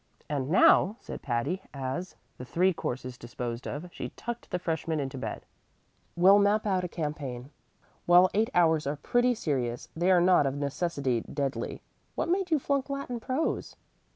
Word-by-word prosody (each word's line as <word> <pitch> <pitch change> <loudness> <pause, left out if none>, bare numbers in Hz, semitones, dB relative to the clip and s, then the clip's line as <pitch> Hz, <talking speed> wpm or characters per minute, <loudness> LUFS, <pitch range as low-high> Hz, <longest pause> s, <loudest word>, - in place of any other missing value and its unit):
"And 140 -2 -2
now," 185 +3 +5
said - - -8
Patty, 135 +9 -1
as, 135 +7 -4 0.2
the - - -6
three 180 +8 +2
courses 125 -5 -5
disposed 120 0 -5
of, 150 +5 -5
she - - -5
tucked 240 0 -6
the 180 - -1
freshman 160 -2 -2
into 135 -1 -3
bed, 130 - -5 0.7
"we'll 190 +4 +7
map 205 +2 +3
out 190 -3 +1
a - - -1
campaign. 145 -6 -5 0.6
While 175 +1 +7
eight 220 +2 +2
hours 160 -4 +3
are 145 - -1
pretty 245 - +1
serious, 125 - -2
they 175 +3 +1
are 185 -1 +6
not 175 -5 +4
of 135 - -2
necessity 140 -4 -1
deadly. 140 -1 -3 0.3
What - - -1
made 370 +1 +1
you 315 - +3
flunk 280 0 -1
Latin 275 -3 -4
prose?" 260 +7 -2
165 Hz, 165 wpm, -28 LUFS, 135-200 Hz, 0.7 s, we'll